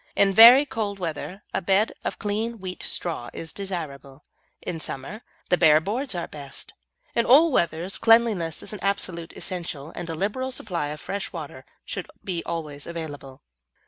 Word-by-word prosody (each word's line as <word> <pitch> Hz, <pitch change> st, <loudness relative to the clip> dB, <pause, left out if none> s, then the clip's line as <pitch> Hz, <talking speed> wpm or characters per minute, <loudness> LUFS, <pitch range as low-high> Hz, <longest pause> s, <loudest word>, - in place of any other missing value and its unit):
In 195 Hz, -1 st, +4 dB
very 240 Hz, +7 st, +10 dB
cold 210 Hz, -6 st, -3 dB
weather 180 Hz, +3 st, -5 dB
a -, -, 0 dB
bed 195 Hz, +5 st, +3 dB
of -, -, -3 dB
clean 220 Hz, +3 st, -2 dB
wheat 185 Hz, -2 st, -7 dB
straw 160 Hz, -9 st, -3 dB
is 165 Hz, -1 st, -7 dB
desirable, 150 Hz, -8 st, -6 dB, 0.4 s
in 165 Hz, -, -5 dB
summer 155 Hz, -, -6 dB, 0.3 s
the 180 Hz, -, +3 dB
bare 155 Hz, -3 st, +7 dB
boards 225 Hz, -, -3 dB
are 170 Hz, -, -3 dB
best. 140 Hz, -2 st, -9 dB, 0.4 s
In 235 Hz, -, +3 dB
all 300 Hz, +6 st, +7 dB
weathers 170 Hz, -, 0 dB
cleanliness 225 Hz, -8 st, +3 dB
is -, -, -6 dB
an 210 Hz, -, -6 dB
absolute 180 Hz, -4 st, -2 dB
essential, 165 Hz, -5 st, -5 dB
and 170 Hz, -, -5 dB
a 165 Hz, -, -3 dB
liberal 215 Hz, +9 st, -1 dB
supply 175 Hz, -, -2 dB
of 150 Hz, +1 st, -6 dB
fresh 200 Hz, +4 st, -4 dB
water 145 Hz, -6 st, -8 dB, 0.2 s
should -, -, -5 dB, 0.2 s
be 175 Hz, -3 st, -2 dB
always 150 Hz, -4 st, -5 dB
available. 145 Hz, -5 st, -7 dB
180 Hz, 165 wpm, -25 LUFS, 155-210 Hz, 0.4 s, very